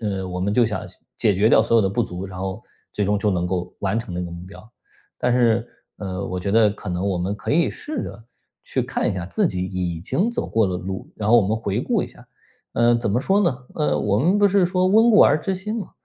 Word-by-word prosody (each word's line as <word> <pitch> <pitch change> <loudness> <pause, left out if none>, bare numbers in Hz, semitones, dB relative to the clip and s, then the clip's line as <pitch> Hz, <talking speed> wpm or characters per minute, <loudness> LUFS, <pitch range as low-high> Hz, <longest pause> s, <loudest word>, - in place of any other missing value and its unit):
呃， 95 -4 -3
我 90 0 -4
们 100 +2 0
就 120 - +4
想 105 -1 -3
先 - - -16 0.2
解 105 - +3
决 105 +4 +3
掉 110 - +6
所 115 +1 +2
有 110 - +5
的 95 - +1
不 120 +5 0
足， 90 -1 -5
然 95 -1 -8
后 95 +4 -4 0.3
最 105 - -1
终 105 +1 +1
就 105 0 +1
能 90 -1 0
够 90 0 -3
完 100 +3 0
成 95 -6 -6
那 90 - -2
个 85 - -6
目 85 +1 -8
标。 110 +4 -14 0.5
但 125 0 +1
是， 120 -1 +2 0.3
呃， 95 -1 -4
我 90 0 -4
觉 100 - -2
得 110 0 +5
可 105 -1 -8
能 90 +2 -2
我 95 -3 0
们 95 +3 -2
可 - - -5
以 160 -5 +3
试 275 - -5
着 105 +3 -9 0.4
去 - - -1
看 - - -1
一 - - -1
下 90 -2 -4
自 - - +1
己 90 -1 -2
已 90 -3 -3
经 195 - 0
走 235 - -3
过 110 -2 +2
的 90 -1 -2
路， 95 +1 -6
然 105 -1 -2
后 120 - +7
我 115 - +5
们 110 - +1
回 105 -3 -2
顾 - - 0
一 - - -4
下。 - - -17 0.5
嗯， 120 0 +3
怎 110 -4 -1
么 120 - +1
说 195 +8 +2
呢？ 140 -10 +1 0.2
呃， 75 0 0
我 105 0 +1
们 180 - +2
不 205 - +5
是 195 -1 +3
说： 185 0 +1
“温 220 +5 +5
故 210 - +6
而 155 - +5
知 195 - -2
新 210 +4 -4
“吗？ - - -8
105 Hz, 290 characters per minute, -22 LUFS, 95-120 Hz, 0.5 s, 后